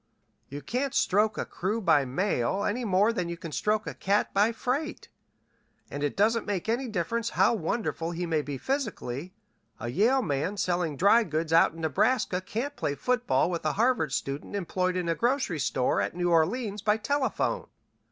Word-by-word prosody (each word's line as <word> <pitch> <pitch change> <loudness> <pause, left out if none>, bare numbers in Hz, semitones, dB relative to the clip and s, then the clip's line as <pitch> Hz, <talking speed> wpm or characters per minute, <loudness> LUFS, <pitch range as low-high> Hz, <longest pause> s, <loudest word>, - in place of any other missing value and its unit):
You 145 +1 -7
can't 255 - -2
stroke 210 +3 +2
a - - -2
crew 205 +5 -2
by 160 -9 +3
mail 180 +4 0
any 240 +5 -1
more 205 +2 +3
than 180 -6 -2
you 170 - -4
can 165 -2 -8
stroke 210 +6 0
a - - -4
cat 200 +2 0
by 205 +3 +3
freight, 275 +7 -3 0.8
and 145 - -5
it 145 +3 -2
doesn't 225 +3 +2
make 200 -2 -2
any 240 +4 0
difference 225 +3 -1
how - - +5
wonderful 175 -3 -2
he 175 +1 -3
may 160 -2 0
be 145 -2 -5
physically, 185 - -3 0.4
a 120 - -4
Yale 235 - +3
man 150 +5 -1
selling 175 -6 -1
dry 205 - +5
goods 160 -2 -2
out 165 -1 +5
in 165 - -8
Nebraska 180 - +1
can't 245 +9 -4
play 145 - -2
football 245 - +1
with 170 - -3
a 155 - 0
Harvard 230 - +1
student 140 +8 -3
employed 185 -1 -1
in 180 -2 -2
a 165 - +2
grocery 240 - 0
store 125 -6 +1
at 100 - -3
New 175 0 0
Orleans 200 +6 +1
by 210 +1 +2
telephone. 280 +4 -1
190 Hz, 180 wpm, -28 LUFS, 160-230 Hz, 0.8 s, how